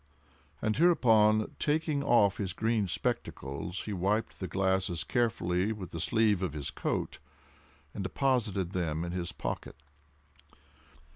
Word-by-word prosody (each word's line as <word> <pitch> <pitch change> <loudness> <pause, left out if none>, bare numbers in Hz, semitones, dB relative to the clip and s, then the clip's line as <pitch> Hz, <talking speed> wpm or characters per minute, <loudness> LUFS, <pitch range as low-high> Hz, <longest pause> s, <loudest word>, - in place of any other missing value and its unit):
And 110 -1 +1
hereupon, 110 -10 +4
taking 150 -1 +1
off 105 -7 +4
his 95 -3 -3
green 110 -1 0
spectacles, 80 +1 -3
he 105 - -4
wiped 100 +4 -1
the 95 - -3
glasses 95 -3 0
carefully 100 -5 0
with 100 -5 -6
the 85 - -5
sleeve 105 0 +2
of 90 -5 -2
his 75 -3 -4
coat, - - -3 0.7
and 100 - -5
deposited 105 -4 0
them 85 -3 -1
in 85 - -4
his 90 -1 -3
pocket. - - -5
100 Hz, 130 wpm, -30 LUFS, 90-110 Hz, 0.7 s, hereupon